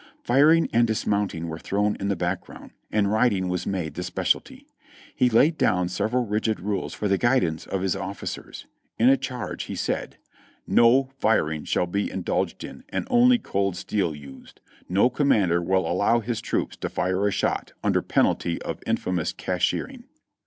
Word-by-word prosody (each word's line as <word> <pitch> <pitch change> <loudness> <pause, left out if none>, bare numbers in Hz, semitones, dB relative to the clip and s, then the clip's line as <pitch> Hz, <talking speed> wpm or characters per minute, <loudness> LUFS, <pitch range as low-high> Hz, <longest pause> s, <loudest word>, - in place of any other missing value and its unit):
Firing 150 +6 +4
and 120 +1 +4
dismounting 100 -6 -1
were 80 0 -6
thrown 105 +3 0
in 100 - -2
the 100 - +1
background, 90 +1 -5 0.2
and 105 -2 +1
riding 105 -5 +2
was 90 -1 -2
made 90 -5 -2
the - - -5
specialty; - - -2 0.5
he 125 - +3
laid 150 +8 +3
down 90 -4 +2
several 120 +7 0
rigid 110 0 -1
rules 100 +1 -3
for 105 - -2
the 95 -1 +1
guidance 95 -11 +1
of 95 -1 -2
his 95 -1 0
officers. 95 0 -6 0.3
In 120 +3 +5
a 135 - +6
charge, 125 -3 -5
he - - -6
said: - - -3 0.5
"No 130 +3 +4
firing 80 -10 +1
shall - - +1
be 100 +4 -2
indulged 95 - -2
in, - - -9
and - - -3
only 245 0 +6
cold 100 - -1
steel 95 -5 -1
used. 70 -2 -13 0.3
No 95 +6 +4
commander 110 - +2
will 95 0 +1
allow 100 +7 +2
his 115 0 -3
troops - - -2
to - - -4
fire 95 +2 0
a - - +1
shot - - -1
under - - +2
penalty 85 -1 +1
of - - -5
infamous 90 -3 -1
cashiering." 235 - -2
100 Hz, 165 wpm, -25 LUFS, 90-120 Hz, 0.5 s, a